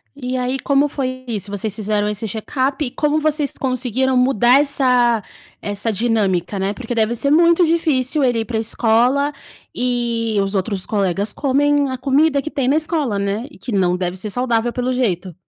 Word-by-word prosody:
E 255 -2 -4
aí, 255 +2 -2
como 280 +1 +2
foi 255 -2 -4
isso? 205 -3 -4
Vocês 205 0 -3
fizeram 210 -1 -1
esse 210 +1 -3
check-up, 265 +7 -2
e 245 - -3
como 300 0 0
vocês 300 -2 0
conseguiram 255 0 -1
mudar 250 0 +4
essa 250 -6 +2 0.4
essa 205 +2 -2
dinâmica, 205 -4 0
né. 195 +2 -1
Porque 245 0 -6
deve 225 +1 +1
ser 280 +4 0
muito 340 +2 +5
difícil 305 -4 +1
ele 245 -3 +2
ir 225 - -2
para 225 -1 -3
a - - 0
escola, 245 +6 +2 0.4
e 235 -3 -1
os 195 +1 -2
outros 195 0 -2
colegas 200 0 -1
comem 285 0 +1
a 260 - -3
comida 280 +2 +2
que 310 - -5
tem 265 -3 -1
na 280 - +3
escola, 305 - 0
né, 200 +5 -2
e - - -16
que 245 - -7
não 180 -3 +2
deve 180 0 -3
ser 210 +3 -4
saudável, 240 0 0
pelo 250 +1 -1
jeito. 190 -8 -1
245 Hz, 185 wpm, -19 LUFS, 210-275 Hz, 0.4 s, muito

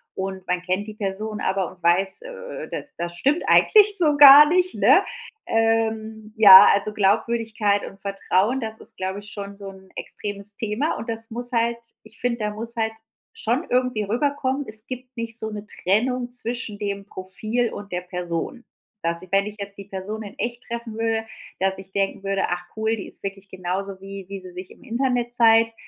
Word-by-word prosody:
und 190 -1 -5
man 180 0 0
kennt 185 +3 -2
die 215 - -8
Person 210 +1 -4
aber 190 -1 0
und 185 -1 -19
weiß, 185 - +2
äh, - - -8
das - - -6
das 175 0 -4
stimmt 280 - +1
eigentlich 420 -2 +6
so 300 -4 +3
gar 290 +1 +11
nicht, 365 +1 +1
ne? - - +5 0.4
Ähm, 220 -1 0
ja, 200 -2 +11
also 200 +1 0
Glaubwürdigkeit 215 0 +1
und 195 - -11
Vertrauen, 200 +4 0
das 220 -2 -5
ist, - - -6
glaube 190 +1 -3
ich, 205 0 -12
schon 200 -1 -7
so 200 -1 -8
'n 190 -1 -15
extremes 205 0 -4
Thema, 225 +8 -1
und 230 - -7
das 225 0 -4
muss 245 +1 -1
halt 235 0 +1 0.3
ich 220 0 -10
finde, 245 -1 -1
da 210 -1 -1
muss 230 +3 -6
halt 225 -1 -1 0.4
schon 245 +9 -1
irgendwie 250 -4 +1
rüberkommen: 270 +5 -1
„Es 215 +1 -3
gibt 255 0 -8
nicht 230 0 -3
so 220 - -3
'ne 210 0 -7
Trennung 245 +7 0
zwischen 235 -3 -2
dem 200 -1 -4
Profil 215 +5 -2
und 205 -1 -9
der 180 - -2
Person.“ 180 +6 -5 0.4
Dass 170 0 -1
ich, 185 0 -14
wenn 195 0 +3
ich 210 0 -8
jetzt 200 0 -7
die 200 - -9
Person 205 +3 -6
in 200 - -11
Echt 240 +1 -3
treffen 235 -2 -6
würde 225 0 -1 0.3
dass 190 0 +1
ich 190 0 -12
denken 195 0 -1
würde: 195 0 0
„Ach, 175 0 -3
cool, 220 +1 0
die 195 - -7
ist - - -11
wirklich 195 0 -6
genauso 190 +1 -4
wie 195 0 -8
wie 195 - -6
sie 185 - -11
sich 180 +1 -9
im - - -17
Internet 245 -1 -1
zeigt“ 225 -1 +5
215 Hz, 195 wpm, -23 LUFS, 195-235 Hz, 0.4 s, gar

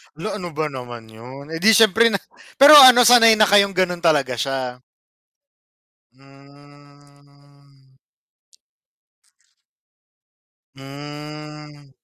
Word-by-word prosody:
La 210 +5 -8
ano 175 -4 -11
ba 155 -1 -5
naman 120 -3 -12
yun 130 +7 -15
eh, 165 - -8
di 220 +4 +2
syempre 225 +1 +2
na 200 -3 -3 0.4
pero 295 +2 +6
ano 250 -2 +6
sanay 230 -2 +4
na 215 -1 0
kayong 200 -1 +1
ganun 180 -1 -3
talaga 145 -7 -2
siya. 130 -1 -6 1.3
Hmm. 140 0 -26 2.8
Hmm. 150 +1 -14
145 Hz, 95 wpm, -17 LUFS, 135-190 Hz, 2.8 s, pero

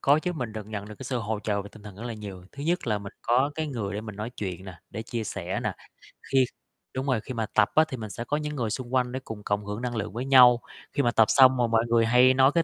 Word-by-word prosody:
Có 145 +2 +4
chứ, 180 +3 -2
mình 125 -9 -4
được 110 -2 -6
nhận 105 -1 -6
được 105 - -8
cái 130 - -8
sự 125 0 -2
hỗ 110 -1 -2
trợ 100 -2 -1
về 100 - -10
tinh 110 - -14
thần 100 -3 -10
rất 110 - -9
là 120 -2 -4
nhiều, 100 -4 -8
thứ 140 - -8
nhất 170 0 0
là 105 -3 +1
mình 100 -1 -9
có 130 +4 +3
cái 160 0 -2
người 110 -8 -4
để 105 - -2
mình 105 -2 -8
nói 110 +3 -4
chuyện 95 -2 -5
nè, 90 -4 -10
để 110 +3 -5
chia 115 -1 -4
sẻ - - -3
nè, - - -1 0.6
khi 135 -1 +5 0.5
đúng 130 +1 -3
rồi, 130 -6 +1
khi 130 - -7
mà 115 -2 -1
tập - - +4
á 155 - +7
thì 130 - -5
mình 110 -3 -6
sẽ 115 - -5
có 145 +4 0
những 150 -1 -4
người 120 -5 -1
xung 120 +2 -5
quanh 125 -1 +2
để 130 - -3
cùng 105 -2 -7
cộng 100 0 -1
hưởng 105 +3 -4
năng 120 -1 -3
lượng 105 0 -3
với 120 +3 -3
nhau, 125 -3 +7 0.3
khi 140 - +1
mà 120 - +3
tập 110 -1 +5
xong 130 -1 +6
mà 120 -1 +2
mọi 115 0 +2
người 115 -1 +3
hay 125 +2 +6
nói 130 +1 +5
cái 165 - +4
115 Hz, 310 wpm, -27 LUFS, 105-130 Hz, 0.6 s, á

